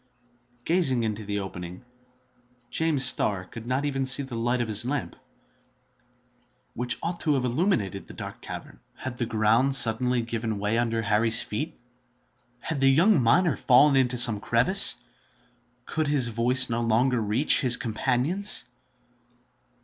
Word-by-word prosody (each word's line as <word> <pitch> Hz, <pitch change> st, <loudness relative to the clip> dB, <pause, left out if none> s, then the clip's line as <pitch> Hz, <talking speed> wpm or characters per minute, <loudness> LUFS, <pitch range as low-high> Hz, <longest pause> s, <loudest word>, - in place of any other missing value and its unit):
Gazing 155 Hz, -9 st, +1 dB
into 110 Hz, -1 st, -4 dB
the 100 Hz, 0 st, -3 dB
opening, 90 Hz, +2 st, -9 dB, 0.9 s
James 155 Hz, -5 st, +1 dB
Starr 95 Hz, -6 st, +1 dB
could 115 Hz, +4 st, -11 dB
not 130 Hz, +3 st, -2 dB
even 135 Hz, -2 st, -2 dB
see 130 Hz, +2 st, +4 dB
the 130 Hz, -2 st, -10 dB
light 120 Hz, +2 st, -2 dB
of 120 Hz, -, -2 dB
his 105 Hz, 0 st, +2 dB
lamp, 135 Hz, +2 st, -4 dB, 1.6 s
which 125 Hz, +1 st, -2 dB
ought 170 Hz, +1 st, -4 dB
to 150 Hz, -3 st, 0 dB
have 130 Hz, -2 st, -2 dB
illuminated 120 Hz, -, -2 dB
the -, -, -13 dB
dark -, -, -9 dB
cavern. -, -, -10 dB, 0.2 s
Had 130 Hz, -2 st, -8 dB
the 120 Hz, -, -3 dB
ground 115 Hz, +4 st, +1 dB
suddenly 125 Hz, 0 st, +2 dB
given 115 Hz, -2 st, -4 dB
way 105 Hz, +3 st, -1 dB
under 115 Hz, -1 st, -2 dB
Harry's 110 Hz, +2 st, +2 dB
feet? 150 Hz, +10 st, -6 dB, 0.8 s
Had 150 Hz, -4 st, -5 dB
the 135 Hz, -, +4 dB
young 170 Hz, +5 st, +3 dB
miner 155 Hz, +7 st, +2 dB
fallen 140 Hz, +3 st, +3 dB
into 125 Hz, -2 st, +1 dB
some 115 Hz, -3 st, +5 dB
crevice? 125 Hz, -, +3 dB, 0.9 s
Could 155 Hz, -1 st, -2 dB
his 140 Hz, -5 st, +3 dB
voice 125 Hz, +3 st, +2 dB
no 120 Hz, -1 st, -3 dB
longer 120 Hz, +2 st, 0 dB
reach 110 Hz, +10 st, +2 dB
his 125 Hz, -3 st, +5 dB
companions? 130 Hz, -, 0 dB
125 Hz, 145 wpm, -25 LUFS, 115-135 Hz, 1.6 s, some